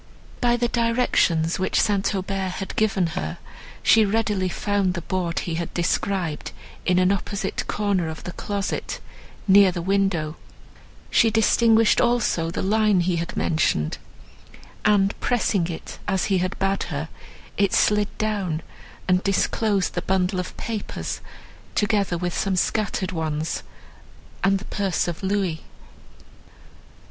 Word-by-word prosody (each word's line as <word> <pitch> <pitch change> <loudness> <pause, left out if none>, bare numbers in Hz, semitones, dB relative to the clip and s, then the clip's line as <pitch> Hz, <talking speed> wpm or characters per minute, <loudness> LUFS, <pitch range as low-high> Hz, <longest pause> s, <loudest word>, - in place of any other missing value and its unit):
By 240 0 +3
the 240 0 +1
directions 230 -9 +2
which 185 - +1
St. 200 0 +1
Aubert 190 -1 -2
had 195 0 -5
given 200 -4 +2
her, 75 0 -3 0.5
she 225 - +6
readily 205 -3 0
found 200 -1 0
the 170 - -4
board 175 -2 -1
he 170 - -4
had 170 - -5
described 175 -2 -1 0.3
in 180 -1 +3
an 185 +1 +4
opposite 200 +1 -2
corner 200 -5 0
of 160 - -7
the 180 - -5
closet, 200 +2 -3 0.5
near 195 -1 +7
the 175 - -4
window; 190 -5 0 0.7
she 225 - +5
distinguished 225 0 +4
also 220 -9 +1
the 170 - -3
line 210 -1 +3
he 175 0 0
had 170 0 -4
mentioned, 80 - +1 0.9
and, 200 -1 +4
pressing 205 -7 +1
it 170 -2 -7
as 190 -1 +1
he 185 - +3
had 185 +1 -2
bade 195 +1 0
her, 150 0 -3 0.5
it 200 -1 +2
slid 210 0 +3
down, 195 -7 -1 0.4
and 185 0 +3
disclosed 195 0 +1
the 175 - -2
bundle 185 0 0
of 180 - -5
papers, 220 -3 -4 0.5
together 205 -4 +1
with 175 0 -3
some 195 -1 0
scattered 195 0 0
ones, 160 -2 -2 0.8
and 195 0 +4
the 195 - -9
purse 195 -5 -1
of 170 -1 -4
louis. 190 -4 -1
190 Hz, 135 wpm, -24 LUFS, 175-205 Hz, 0.9 s, near